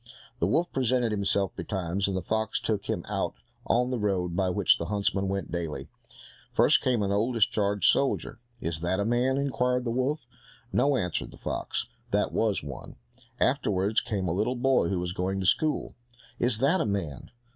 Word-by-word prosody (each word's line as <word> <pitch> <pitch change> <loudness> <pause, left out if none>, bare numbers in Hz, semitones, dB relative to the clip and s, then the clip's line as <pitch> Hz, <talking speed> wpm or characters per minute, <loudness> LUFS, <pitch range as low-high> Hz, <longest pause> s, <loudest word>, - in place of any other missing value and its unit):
The 85 - +2
wolf 170 - +1
presented 125 -2 +1
himself 100 -1 0
betimes, 95 0 -2
and 95 -1 -1
the 95 - -3
fox 110 +3 0
took 105 -3 -1
him - - -2
out - - -2 0.3
on 125 +2 +2
the 125 - -1
road 90 -4 0
by 95 0 +1
which 95 0 +3
the 85 - -3
huntsmen 100 -1 0
went 95 -5 -3
daily. 85 -3 -4 0.7
First - - +5
came 120 -5 +1
an 100 - 0
old 110 +5 +1
discharged 100 -2 +1
soldier. 135 -3 +1 0.2
"Is 80 -3 -3
that 90 +3 0
a 100 - +1
man?" 125 +3 +2
inquired 125 -2 +1
the 120 - -1
wolf. 130 +4 -1 0.5
"No," 140 -1 +3
answered 90 -6 -2
the - - -13
fox, - - -3 0.2
"that - - +1
was 110 -7 +1
one." 70 -3 -8 0.4
Afterwards 100 +2 +2
came 105 -6 -2
a 80 - 0
little 110 +7 0
boy 130 -5 +3
who 95 - 0
was 90 0 -3
going 95 +1 -1
to 95 - -2
school. 155 - +1 0.5
"Is 120 -2 +1
that 140 +10 +3
a - - +1
man?" 95 -9 -3
100 Hz, 185 wpm, -28 LUFS, 95-125 Hz, 0.7 s, First